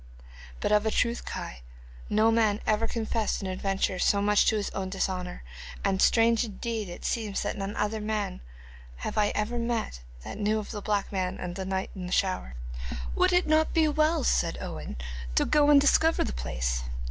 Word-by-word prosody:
'But - - 0
of 210 +1 +4
a - - +4
truth, 235 +2 0
Kai, - - -6 0.5
no 215 +2 +4
man 220 -2 +3
ever 220 +1 +2
confessed 225 -1 -1
an 195 - -4
adventure 190 0 -1
so 200 - +3
much 205 0 +3
to - - +4
his 210 -1 -2
own 190 -1 -3
dishonour, 185 - -3 0.4
and 195 -1 +1
strange 230 0 +4
indeed 220 -1 -4
it 175 - -8
seems 215 -4 -1
that - - -2
none 195 0 -4
other 210 +1 -1
man 210 - -2 0.6
have - - -3
I 210 -1 +3
ever 225 +3 -1
met 230 - -2 0.2
that 200 - -7
knew 210 +1 +1
of 215 - -5
the 210 -3 -5
black 205 -1 -1
man, 185 -1 -2
and 175 -1 -5
the 190 0 -4
knight 190 0 -2
and 180 -2 -6
the - - -2
shower.' 185 - 0 0.6
'Would - - +3
it 355 0 +3
not 310 +1 +2
be 320 -1 +5
well,' 310 0 +2
said - - +1
Owen, - - -6 0.4
'to - - +4
go 295 -1 +4
and 290 -1 +8
discover 320 +3 +4
the - - -3
place? - - -2
210 Hz, 195 wpm, -28 LUFS, 190-230 Hz, 0.6 s, and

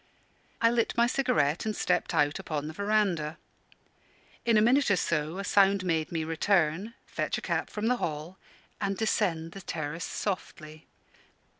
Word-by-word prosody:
I 230 - +6
lit 235 -1 0
my 235 - +5
cigarette 160 - +1
and 215 -1 -2
stepped 180 -2 0
out 145 +4 +2
upon 155 -6 -3
the 155 - -6
verandah. 195 -6 0 1.1
In 230 -2 +4
a - - +7
minute 255 +6 +4
or 200 - +5
so 160 -1 -1
a 195 - -3
sound 195 0 +4
made 160 -3 0
me 165 -2 -1
return, 175 +5 +1
fetch - - -2
a - - -5
cap - - -1
from 210 0 -4
the 250 +2 +2
hall, 160 0 -4 0.4
and 195 -1 -1
descend 170 -7 0
the 195 - -9
terrace 160 -1 -4
softly. 155 -7 -5
185 Hz, 160 wpm, -29 LUFS, 155-210 Hz, 1.1 s, a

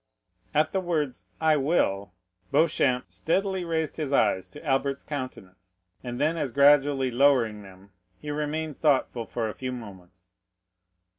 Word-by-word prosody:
At 155 +1 +3
the 190 - 0
words 155 -8 -2
I 160 -1 +3
will, 100 - 0 0.4
Beauchamp 140 -5 +2
steadily 190 +2 -1
raised 160 -2 -2
his 150 -4 -3
eyes 95 -8 +2
to 100 - -13
Albert's 140 0 0
countenance, 95 -10 -8 0.3
and 120 -1 -5
then 160 +3 +1
as 145 -5 -2
gradually 140 -1 +4
lowering 120 -5 +3
them, 95 0 -15 0.3
he 150 - -6
remained 150 0 -3
thoughtful 130 -6 +1
for 115 -2 -2
a 105 - -4
few 130 -1 -5
moments. 95 -6 -11
135 Hz, 140 wpm, -26 LUFS, 110-155 Hz, 0.4 s, gradually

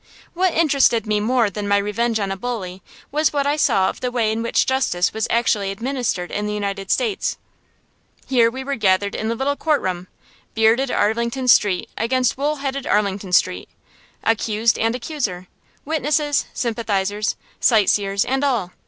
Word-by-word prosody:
What 365 0 +1
interested 275 -8 +3
me 210 -1 +1
more 230 0 +1
than 205 +1 -4
my 200 0 +3
revenge 220 +3 0
on 200 -2 -2
a - - -2
bully 195 -4 -5 0.3
was 305 +2 +2
what 285 -1 0
I 290 +1 +2
saw 195 -10 +2
of - - -4
the 250 - -1
way 235 -3 0
in 220 +1 -2
which 230 - +1
justice 255 -9 0
was 220 -1 -1
actually 220 -4 +1
administered 230 -4 -3
in 210 0 -2
the 210 - -2
United 200 -1 -4
States. 450 -5 0 0.9
Here 240 -3 +3
we 260 +3 -6
were 280 +1 -3
gathered 200 -1 +2
in 220 - -3
the 230 - -1
little 275 +4 -1
courtroom, 190 - -1 0.5
bearded 225 +4 +3
Arlington 235 +4 0
Street 205 -6 +4
against 250 +2 +1
wool 290 +3 -1
headed 275 -1 -4
Arlington 200 -2 0
Street; - - +1 0.5
accused 225 0 +1
and 225 +1 +1
accuser, 235 - -4 0.4
witnesses, 295 -1 0
sympathizers, 210 -3 -1 0.2
sight 215 -5 +4
seers, 200 -1 +1
and 265 +2 -1
all. 235 -10 0
225 Hz, 165 wpm, -21 LUFS, 200-265 Hz, 0.9 s, Street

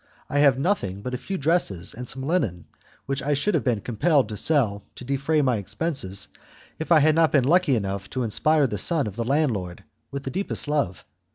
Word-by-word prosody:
I 145 - +1
have 140 -3 +5
nothing 115 - -1
but 125 - -4
a - - -1
few 195 - -4
dresses 145 - 0
and 125 +2 -7
some 130 +2 -5
linen, 120 - -1 0.4
which 135 0 -2
I 145 +1 0
should 200 +9 0
have - - +1
been 120 -6 0
compelled 130 - +1
to 105 - -4
sell 110 -6 +1
to - - -10
defray 140 +4 0
my 125 -4 +2
expenses 100 - -2 0.5
if 160 - -5
I 160 -3 +7
had 155 +2 +4
not 160 0 +3
been 140 -4 +4
lucky 165 0 +3
enough 100 -2 -3
to 130 - -2
inspire 150 +7 +2
the 105 -6 -2
son 160 - +2
of 105 -3 -6
the 115 - -2
landlord 115 - -1 0.3
with 140 0 -6
the 135 - -4
deepest 195 -1 -3
love. 145 -11 -1
135 Hz, 210 wpm, -24 LUFS, 105-155 Hz, 0.5 s, I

